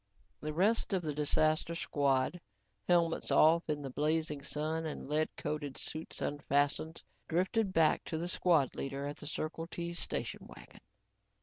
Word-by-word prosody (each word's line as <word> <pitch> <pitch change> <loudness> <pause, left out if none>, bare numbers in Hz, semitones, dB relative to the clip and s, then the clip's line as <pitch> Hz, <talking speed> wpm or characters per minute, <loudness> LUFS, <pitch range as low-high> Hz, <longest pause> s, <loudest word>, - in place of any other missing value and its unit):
The 155 - -4
rest 200 +7 +2
of 185 -2 +1
the 150 -2 -2
disaster 155 +3 +2
squad, 140 +1 +1 0.5
helmets 170 -2 +2
off 165 +2 +5
in 150 -1 -1
the 135 - -5
blazing 150 +1 0
sun 155 +3 -2
and 150 - -6
lead 155 +2 +1
coated 145 -3 -4
suits 155 +1 -4
unfastened, 145 +2 0 0.2
drifted 190 +5 +1
back 160 -3 +3
to 160 - -3
the 170 +2 -2
squad 170 -6 +3
leader 135 +1 -4
at 145 +1 -5
the 150 - -9
Circle 155 +2 -3
T 170 0 -4
station 170 - -3
wagon. - - -14
155 Hz, 150 wpm, -33 LUFS, 145-170 Hz, 0.5 s, off